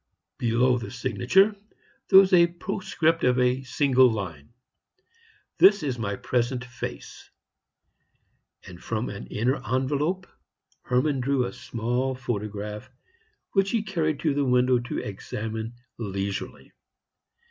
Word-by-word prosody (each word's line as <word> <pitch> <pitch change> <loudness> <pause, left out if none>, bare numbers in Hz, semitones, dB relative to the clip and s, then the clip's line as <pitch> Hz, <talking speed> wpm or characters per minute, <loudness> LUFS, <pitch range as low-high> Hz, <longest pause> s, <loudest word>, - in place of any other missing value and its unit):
Below 125 +1 +2
the 120 - -7
signature 130 - +2 0.5
there 190 - +8
was 190 -1 +7
a 170 -1 +7
postscript 170 -2 -1
of 125 0 +3
a 125 +1 +2
single 130 -1 +3
line: 90 -9 -5 1.1
"This 200 -3 +6
is 130 -4 -2
my 100 -3 -2
present 125 +3 -1
face." 125 -1 -8 1.4
And 90 -1 -12
from 115 +1 -2
an 100 - -8
inner 125 +6 0
envelope 145 - -1 0.6
Hermann 130 +3 +1
drew 130 0 +1
a - - -5
small 125 +3 -2
photograph, 105 -2 -5 0.6
which 195 -1 +2
he 225 -1 0
carried 160 -8 -1
to 155 -3 +1
the 145 0 +1
window 125 -1 +3
to 120 - -5
examine 110 +3 -5 0.2
leisurely. 100 -2 -4
125 Hz, 120 wpm, -26 LUFS, 115-150 Hz, 1.4 s, there